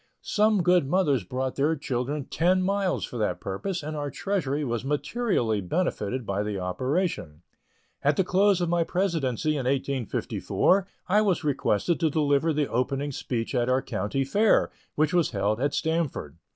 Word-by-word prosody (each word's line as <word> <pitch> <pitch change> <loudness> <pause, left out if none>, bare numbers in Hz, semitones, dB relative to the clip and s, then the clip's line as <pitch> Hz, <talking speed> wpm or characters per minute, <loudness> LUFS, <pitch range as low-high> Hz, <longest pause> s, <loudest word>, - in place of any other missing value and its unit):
Some 210 -3 +2
good 180 -4 +4
mothers 145 - +2
brought 130 +7 -3
their 150 +4 +2
children 135 0 -3
ten 185 +5 +2
miles 195 -1 0
for 120 - -7
that 105 - 0
purpose, 150 - -4
and 155 +1 -4
our 145 -1 -3
treasury 150 -2 -2
was 120 -2 -2
materially 145 - 0
benefited 125 - -2
by 100 0 -1
the 105 -1 -3
operation. 90 - -2 0.6
At 145 +1 +3
the 190 - +4
close 190 +1 +3
of 175 - +1
my 170 0 +2
presidency 160 - 0
in 130 -2 -2
1854, 140 - 0 0.2
I 210 +3 +4
was 195 -6 +1
requested 145 - +1
to 160 - +2
deliver 145 +1 +2
the 150 -2 0
opening 135 +4 -1
speech 120 -2 -3
at 120 -1 +1
our 130 +1 +2
County 105 +8 -2
Fair, 205 +11 +3 0.2
which 155 +2 +1
was 175 -4 +3
held 105 +2 -1
at 145 +1 0
Stamford. 160 - -2
145 Hz, 165 wpm, -26 LUFS, 125-180 Hz, 0.6 s, good